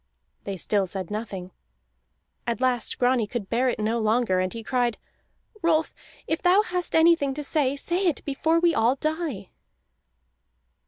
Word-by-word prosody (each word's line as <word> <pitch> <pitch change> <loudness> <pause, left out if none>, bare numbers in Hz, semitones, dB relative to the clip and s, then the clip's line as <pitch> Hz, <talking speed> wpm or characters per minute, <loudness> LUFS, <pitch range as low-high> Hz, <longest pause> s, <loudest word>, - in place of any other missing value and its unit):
They 195 -1 -4
still 195 +2 0
said 185 0 -6
nothing. 195 -4 -5 1.0
At 235 0 -1
last 250 -2 0
Grani 245 -3 +2
could 210 -3 -5
bear 250 +2 +2
it - - -2
no 220 +2 0
longer, 220 -3 +2
and 185 0 0
he 230 -1 -6
cried: 245 -1 0 0.6
"Rolf, 325 -2 +2 0.3
if 320 - -2
thou 370 +4 +5
hast 360 -3 -3
anything 320 -4 +4
to 295 - -4
say, 280 -2 +1
say 355 +6 -1
it 325 - -1
before 315 +4 +1
we 340 0 +3
all 235 0 +3
die!" 310 - -3
255 Hz, 155 wpm, -25 LUFS, 215-320 Hz, 1.0 s, thou